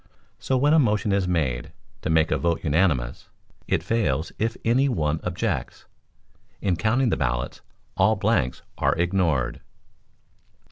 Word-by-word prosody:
So 130 - 0
when 145 +4 +3
a 160 - +6
motion 105 -5 +1
is 100 -2 +1
made 75 -9 -1 0.3
to - - -3
make 80 0 +3
a - - +2
vote 85 -1 0
unanimous, 75 -6 0 0.4
it - - 0
fails 90 -9 0
if 115 +1 -1
any 130 +5 +3
one 80 - 0
objects. 90 0 -3 0.7
In 95 -3 0
counting 115 +8 +1
the - - 0
ballots - - -2 0.3
all 110 0 +3
blanks 105 - 0 0.2
are - - +2
ignored. 85 -8 0
90 Hz, 140 wpm, -24 LUFS, 75-110 Hz, 0.7 s, a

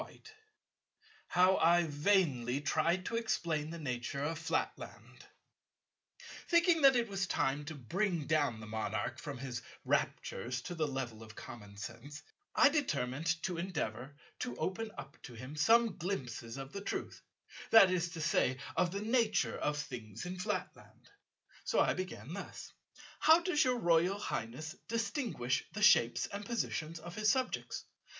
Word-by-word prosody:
§ - - -3
14 - - -17 1.1
How 185 +1 +4
I 175 +1 +5
vainly 145 -6 +2
tried 170 +5 +1
to 230 - -1
explain 170 -9 -1
the 170 - -6
nature 135 -2 -3
of 155 +2 -2
Flatland 160 - -4 1.2
Thinking 340 -1 +4
that 270 -2 +7
it 235 -1 +2
was 195 -2 -2
time 145 -2 0
to 160 +1 -6
bring 170 - -1
down 145 -8 +1
the 110 - -8
Monarch 110 0 -3
from 145 -3 -6
his 120 -2 -5 0.2
raptures 120 +5 -1
to 175 - -5
the 160 -3 0
level 130 -5 -4
of 110 -1 -11
common 105 -5 -10
sense, 120 +8 -8 0.3
I 295 - +7
determined 160 - -1 0.2
to 180 -3 -2
endeavour 145 - -3 0.2
to 120 - -3
open 190 - -2
up - - -10
to 125 - -10
him 130 +6 -8
some 225 +6 +4
glimpses 125 -9 -4
of 135 0 -7
the 200 - -4
truth, - - -4 0.5
that 195 -5 +8
is 175 -1 0
to 165 - -5
say 130 -4 +2 0.2
of 180 - +2
the 200 +3 -4
nature 225 -1 +1
of 150 0 0
things 115 - -6
in 180 +1 -5
Flatland. 180 - -5 0.5
So - - +1
I - - +4
began 180 -4 -6
thus: 195 - -8 0.5
"How 320 +1 +7
does 345 -3 +2
your 250 -1 +2
Royal 175 -1 +3
Highness 155 - -4
distinguish 225 - -1
the 210 +1 -2
shapes 120 - +5
and 200 +1 -6
positions 170 -8 -2
of 170 +2 -9
his 215 +1 +2
subjects? 260 -1 -2
165 Hz, 155 wpm, -34 LUFS, 130-200 Hz, 1.2 s, that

